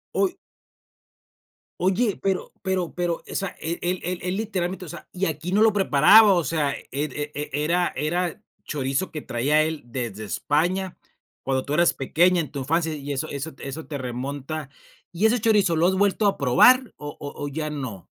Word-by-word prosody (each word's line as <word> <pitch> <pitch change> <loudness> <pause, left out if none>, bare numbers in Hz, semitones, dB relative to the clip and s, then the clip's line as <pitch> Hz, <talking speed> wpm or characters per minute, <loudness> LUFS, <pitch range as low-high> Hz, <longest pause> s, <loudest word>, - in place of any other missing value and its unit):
Uy. 380 -1 +1 1.4
Oye, 195 +4 +1
pero 190 -1 -1
pero 190 -3 -1
pero 175 -1 0
o - - -6
sea 195 -1 -1
él 170 +2 -3
él 180 +1 -1
él 180 +1 -3
él 180 +2 -2
literalmente 190 -4 -3
o - - -11
sea, - - -10
y 185 +1 -1
aquí 160 +2 -3
no 205 - +3
lo 220 -1 +5
preparaba, 195 +3 +6
o 175 -2 +2
sea, 150 -4 0
e - - -8
e 150 +1 -3
e 150 +1 -4 0.2
era 175 +2 +1
era 175 +3 -1 0.2
chorizo 135 +4 -2
que 155 -2 -5
traía 140 +6 +1
él 155 0 -2
desde 115 -4 -5
España 175 - -1 0.5
cuando 130 -1 -1
tú 145 - -3
eras 170 +2 +4
pequeña 175 +6 +2
en 155 - -2
tu 140 - -6
infancia, 160 +4 0
y 145 0 -6
eso 140 +3 -2
eso 145 +3 -5
eso 140 +3 -6
te 145 - -4
remonta 140 +4 -5 0.4
¿y 180 +5 0
ese 220 0 +3
chorizo 205 -6 +3
lo 165 +2 +3
has 190 - +2
vuelto 205 +1 +2
a 200 - +1
probar, 245 - +5
o 145 0 -8
o 145 0 -7
o - - -2
ya 155 +1 -3
no? 130 -11 -6
160 Hz, 190 wpm, -24 LUFS, 145-185 Hz, 1.4 s, preparaba